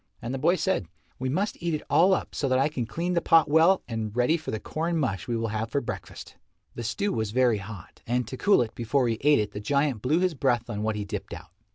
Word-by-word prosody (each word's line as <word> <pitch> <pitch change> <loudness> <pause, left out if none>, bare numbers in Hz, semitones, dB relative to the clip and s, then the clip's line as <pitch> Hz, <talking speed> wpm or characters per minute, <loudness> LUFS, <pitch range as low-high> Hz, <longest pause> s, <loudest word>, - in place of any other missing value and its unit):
And 120 +2 -5
the 135 - -3
boy 175 +7 +3
said, 190 - -1 0.3
"We 130 0 -2
must 190 +9 -2
eat 170 -2 0
it 150 - -5
all 185 +3 +5
up - - -5
so 140 - -1
that 130 - +3
I 135 +3 +2
can 125 -6 -3
clean 170 +10 -2
the 170 - +2
pot 165 -1 +5
well 165 +5 +4
and 110 -2 -4
ready 125 +6 +3
for 160 - -6
the 110 - -2
corn 165 +7 -2
mush 100 - -2
we 120 - -1
will 115 0 -2
have 110 +1 -3
for 140 - 0
breakfast." 125 - -8 0.4
The - - -6
stew 200 - -1
was 110 -2 -1
very 120 -1 +2
hot, 100 -2 -10
and 120 0 0
to 130 - -6
cool 200 -1 +4
it 110 - -8
before 120 +2 0
he 115 -1 -1
ate 145 +1 +5
it 105 -1 -1
the - - -6
giant 140 +1 0
blew 145 +7 +2
his 180 -1 +1
breath 120 -4 0
on 105 -1 -3
what 110 0 -1
he 105 -1 -3
dipped 105 0 -5
out. - - -12
125 Hz, 265 wpm, -26 LUFS, 110-160 Hz, 0.4 s, all